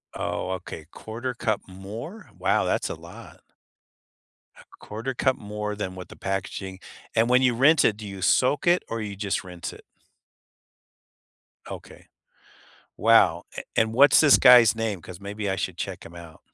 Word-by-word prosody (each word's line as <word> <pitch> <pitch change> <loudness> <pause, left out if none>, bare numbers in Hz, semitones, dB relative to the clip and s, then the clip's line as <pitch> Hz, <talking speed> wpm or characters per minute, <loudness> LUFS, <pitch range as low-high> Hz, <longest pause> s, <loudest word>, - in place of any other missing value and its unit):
Oh, 90 - -3
okay. 80 -4 -7
1/4 120 +3 -6
cup 110 -3 -1
more? 110 - -9
Wow, - - +1
that's - - -1
a - - -4
lot. - - -13 1.2
A - - -16
1/4 115 +5 -5
cup 130 +1 +1
more 105 0 -5
than 95 -3 -5
what 90 - -9
the - - -13
packaging 95 -1 -4 0.4
and 115 +2 +3
when 125 +1 +4
you 125 -2 +3
rinse 150 +5 +4
it, 105 - +3
do 105 -1 -9
you 95 -1 -8
soak 130 - +2
it 175 +1 +4
or 115 - -4
you 105 -2 -5
just 100 0 -2
rinse 90 -2 -7
it? - - -14 1.9
Okay. - - -11 0.9
Wow, 100 -7 +4
a - - -3 0.2
and, 110 0 +2
what's 140 +5 +6
this 150 -3 +6
guy's 120 -4 +7
name? 110 -5 -3
'Cause 90 +2 -11
maybe 100 0 -4
I 95 - -1
should 95 -3 -3
check 95 -1 -6
him 85 - -13
out. 85 -2 -12
105 Hz, 165 wpm, -25 LUFS, 95-120 Hz, 1.9 s, guy's